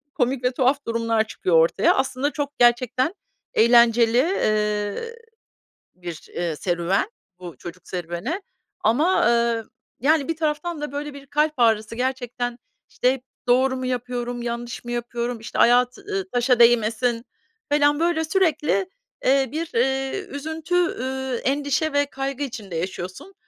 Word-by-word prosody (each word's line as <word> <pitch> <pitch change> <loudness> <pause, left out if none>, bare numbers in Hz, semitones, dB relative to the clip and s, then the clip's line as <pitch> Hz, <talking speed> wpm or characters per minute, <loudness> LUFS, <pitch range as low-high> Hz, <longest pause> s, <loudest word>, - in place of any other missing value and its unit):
komik 255 -1 0
ve 250 - +2
tuhaf 265 +2 +1
durumlar 230 -1 +1
çıkıyor 175 -6 +2
ortaya. 165 +4 +3
Aslında 265 +2 0
çok, 290 -1 -4
gerçekten 250 - +3 0.4
eğlenceli, 235 0 +5
eee, 215 - 0 0.8
bir, 175 -3 -8
eee, 170 -2 -1
serüven, 175 - 0 0.3
bu 175 -3 -9
çocuk 175 0 -10
serüveni 175 - -4 0.4
ama, 310 +1 +3
eee, 235 -1 +2 0.4
yani, 290 +2 +2
bir 330 - -1
taraftan 310 +1 -2
da, 295 - -4
böyle, 290 +1 -5
bir 280 0 -11
kalp 300 +2 +1
ağrısı 225 -1 +2
gerçekten. 245 -1 -3 0.3
İşte, 250 - +2
"Hep 265 -2 -8 0.2
doğru 260 +2 +3
mu 255 - -4
yapıyorum, 245 -1 -3
yanlış 235 0 -5
mı 240 - -5
yapıyorum?" 240 0 -3
İşte, 225 - -6
"Ayağı 245 +1 +5
t 325 - -16
eee, 400 -2 -1
taşa 245 0 +2
değmesin." 235 0 +3 0.5
falan, 290 0 +3
böyle, 335 -1 +1
sürekli, 335 +1 +1 0.4
eee, 270 -1 +3
bir, 320 +2 -3
eee, 265 +7 +1
üzüntü, 315 +4 -4 0.2
eee, 260 -1 -3
endişe 285 +2 0
ve 285 0 +3
kaygı 275 0 -4
içinde 220 -9 -6
yaşıyorsun. 185 - -5
250 Hz, 140 wpm, -23 LUFS, 230-285 Hz, 0.8 s, eğlenceli